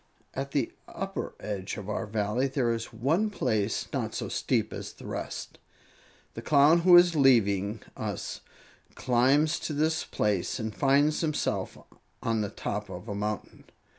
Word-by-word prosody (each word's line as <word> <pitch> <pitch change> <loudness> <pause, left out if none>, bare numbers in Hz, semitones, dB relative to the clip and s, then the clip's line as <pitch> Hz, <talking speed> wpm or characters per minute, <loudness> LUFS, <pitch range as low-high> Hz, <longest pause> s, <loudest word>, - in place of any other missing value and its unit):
"At 135 +1 -3
the 140 -4 0 0.2
upper - - -5
edge 100 -2 -4
of 100 -2 -7
our 105 +1 -3
Valley 105 +5 0
there 130 -3 0
is 115 0 -5
one 155 - +1
place 110 - -1
not - - -2
so - - -3
steep - - 0
as - - -6
the - - -13
rest. - - -6 0.7
The - - -7
Clown 150 +3 +5
who 175 +1 +8
is 175 -1 +6
leaving 110 -7 +3
us - - -4 0.5
climbs 135 +6 +3
to 155 - -4
this 155 +2 +1
place 100 -4 -1
and 110 -3 -4
finds 145 +2 +3
himself 155 -3 -1 0.5
on 115 -1 +1
the 105 - -2
top 105 +1 -4
of 95 +4 -8
a 105 - -3
mountain. 105 0 -4
120 Hz, 155 wpm, -28 LUFS, 105-145 Hz, 0.7 s, who